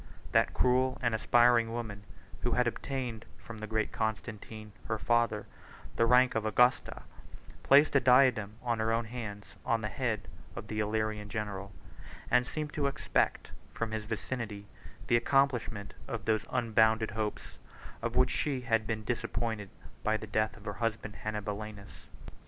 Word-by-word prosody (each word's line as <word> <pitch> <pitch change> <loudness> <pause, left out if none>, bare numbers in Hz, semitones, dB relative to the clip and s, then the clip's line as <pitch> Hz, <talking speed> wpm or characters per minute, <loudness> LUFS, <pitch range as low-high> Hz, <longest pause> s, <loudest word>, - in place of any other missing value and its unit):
That - - +3
cruel 130 +1 +2
and 120 -3 0
aspiring 120 +1 +4
woman, 110 -4 -5 0.4
who 120 - 0
had 125 +1 +3
obtained 120 -2 -3
from 115 -2 -10
the 110 - -5
great 110 0 -1
Constantine, 110 -1 -4
her 110 - -1
father, 115 -2 +1 0.5
the 115 - +3
rank 125 +1 +5
of 110 - 0
Augusta, 125 +3 +2 0.6
placed 145 +3 +6
the 140 - +6
diadem 125 -5 +4
with 120 -2 0
her 110 +1 +1
own 115 +1 +1
hands 105 -5 -7
on 115 -3 +1
the 105 - -2
head 110 -5 -2 0.3
of 110 -3 -7
the 110 - -2
Illyrian 105 -1 -1
general; 100 -2 -4 0.6
and 125 0 +4
seemed 150 -1 -4
to 145 -2 0
expect 140 +2 0 0.2
from 115 -1 -2
his 110 -1 -3
victory 110 -2 -4 0.4
the 120 - +4
accomplishment 120 -5 +1
of 110 -2 -5
those 110 -1 +1
unbounded 110 -2 +2
hopes, 105 -1 -4 0.4
of 115 +1 -3
which 125 0 +4
she 135 -4 -1
had 115 -3 +1
been 110 -1 -2
disappointed 110 -2 -2 0.3
by 110 0 +2
the 110 - -7
death 110 +1 0
of 105 - -15
her 105 - -3
husband 110 -2 -2
Hannibalianus. 105 -1 -5
110 Hz, 155 wpm, -31 LUFS, 110-120 Hz, 0.6 s, placed